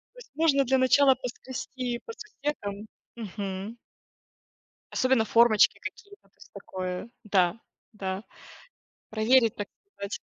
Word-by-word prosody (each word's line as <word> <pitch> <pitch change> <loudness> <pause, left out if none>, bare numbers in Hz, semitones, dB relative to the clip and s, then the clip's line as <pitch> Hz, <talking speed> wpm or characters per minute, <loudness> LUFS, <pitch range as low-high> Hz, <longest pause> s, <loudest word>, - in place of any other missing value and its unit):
То - - -13
есть, - - -14
можно 295 -3 +4
для 265 +2 +3
начала 265 +1 +5
поскрести 250 0 -5
по 460 - -6
сусекам. 285 - -5 0.3
Мгм. 200 0 -5 1.2
Особенно 255 -3 +3
формочки 230 -1 +5
какие-то. 405 0 -9
То - - -42
есть, - - -17
такое, 185 +3 -5
да. 195 -1 +2 0.3
Да. 190 -1 -4 0.9
Проверить, 225 +1 +4
так 205 - -4 0.3
сказать. 200 0 -5
230 Hz, 115 wpm, -28 LUFS, 200-265 Hz, 1.2 s, начала